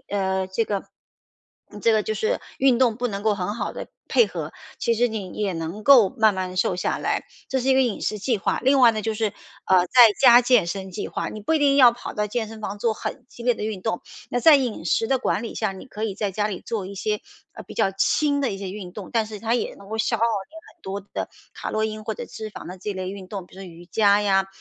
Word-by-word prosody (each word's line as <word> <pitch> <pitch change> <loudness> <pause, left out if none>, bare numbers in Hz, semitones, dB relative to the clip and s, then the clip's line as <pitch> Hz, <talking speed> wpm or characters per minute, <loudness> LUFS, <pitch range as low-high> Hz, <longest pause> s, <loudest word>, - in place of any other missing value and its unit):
饮 200 0 -3
呃， 190 0 0
这 210 +5 0
个 200 -3 -3 0.8
嗯， 210 - -10
这 230 - +3
个 215 -1 +3
就 215 - -2
是 215 +1 -1 0.2
运 260 -3 +4
动 240 -4 +3
不 245 +1 -1
能 200 -3 -4
够 215 0 +3
很 200 +1 -3
好 235 - -3
地 - - -7 0.2
配 470 - +4
合， - - -6 0.3
其 235 - +1
实 240 +2 +3
你 220 -5 -5
也 210 - -2
也 - - -1
能 165 +5 -5
够 255 -8 +7
慢 220 -1 +3
慢 185 -1 -4
瘦 180 - +1
下 - - -1
来。 - - -1 0.2
这 265 - 0
是 260 - -2
一 265 - +5
个 265 - +5
饮 240 -5 -1
食 215 - -2
计 220 +3 0
划。 - - 0
另 270 +1 +4
外 245 -2 +8
呢， 215 -1 -3
就 220 +1 -1
是， 215 -1 -2 0.3
呃， 185 -1 +4
在 - - -34 0.3
家 245 -2 +8
健 245 -6 +3
身 190 +2 -4
计 195 +3 -5
划。 - - -3
你 215 - -8
不 215 - 0
一 320 - +3
定 280 -1 +3
要 250 -4 +8
跑 240 - -8
到 210 0 0
健 220 +1 -3
身 220 0 -10
房 205 0 -4
做 225 +1 0
很 - - -6
激 240 - -12
烈 245 +1 +3
的 210 - -5
运 210 -4 -4
动。 180 - -1 0.3
那 245 - 0
在 305 +2 +8
饮 240 -10 -2
食 225 - +2
的 265 +1 +1
管 230 - -1
理 230 - -6
下， 215 -3 -1
你 190 - -10
可 215 -4 -5
以 210 -3 -2
在 205 0 -2
家 210 +2 -1
里 195 -4 -5
做 210 -5 -3
一 200 - -8
些， 210 +2 -2 0.3
呃， - - -9
比 - - -11
较 195 - +2
轻 285 +8 +1
的 270 - 0
一 195 - -4
些 195 -1 -6
运 190 -2 -7
动， 205 -3 -8
但 225 -2 +1
是 215 -1 -8
它 225 +2 0
也 245 - -2
能 200 +1 -15
够 220 - -3
消 220 - +1
耗 - - -3
你 230 +4 -1 0.2
很 350 - -44
多 195 +1 -4
的 - - -3 0.2
卡 - - -6
洛 215 - 0
因 215 0 -4
或 220 - -3
者 - - -6
脂 220 -1 -8
肪 - - -9
的 180 +1 -8
这 200 +2 -4
类 185 0 -4
运 195 -2 -9
动。 195 -2 -6
比 - - -19
如 190 - -11
说 - - -8
瑜 170 +1 -13
伽 205 +2 +3
呀， 195 -1 +2
215 Hz, 300 characters per minute, -23 LUFS, 195-235 Hz, 0.8 s, 外